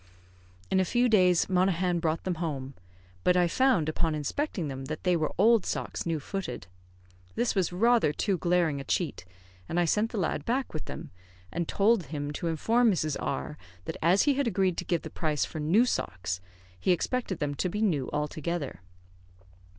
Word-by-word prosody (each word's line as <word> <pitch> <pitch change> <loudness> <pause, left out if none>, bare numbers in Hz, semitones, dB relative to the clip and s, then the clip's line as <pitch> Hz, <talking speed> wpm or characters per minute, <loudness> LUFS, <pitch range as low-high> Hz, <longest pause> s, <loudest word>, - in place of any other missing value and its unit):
In 190 - +3
a - - +4
few 240 +6 +2
days, 185 -6 +4
Monaghan 180 -1 +2
brought 160 -1 -1
them 180 -3 -2
home; 140 -5 -3 0.5
but 180 0 +4
I 175 -1 +4
found 200 - +2
upon 155 0 0
inspecting 170 - -2
them 135 -1 -5
that 155 +3 -5
they 180 -1 +3
were 155 -2 0
old 220 +2 +5
socks - - -3
new 165 -2 0
footed. 160 - -5 0.7
This 240 0 +1
was 190 -4 +1
rather 230 -1 +3
too 190 +4 -1
glaring 170 -5 +1
a - - -7
cheat, 140 - -2 0.4
and 175 - 0
I 175 - +3
sent 210 +7 +1
the 230 - -4
lad 160 -5 -1
back 255 - -1
with 155 - -5
them, - - -8 0.4
and 170 -1 -2
told 205 -2 +3
him 145 0 -4
to 170 - -3
inform 225 +9 +3
Mrs. 155 -5 0
R 70 +4 -3 0.3
that - - -4
as 180 +5 +4
he 290 - +3
had 275 -1 0
agreed 190 -4 +1
to - - -3
give 170 -2 0
the - - -7
price 155 -3 0
for 155 - -7
new 175 +11 +4
socks, 90 - -2 0.4
he 135 - +2
expected 200 +1 -1
them 145 -2 -2
to 180 +6 -1
be 210 +4 -2
new 150 -11 +1
altogether. 150 - -3
175 Hz, 190 wpm, -28 LUFS, 155-200 Hz, 0.7 s, old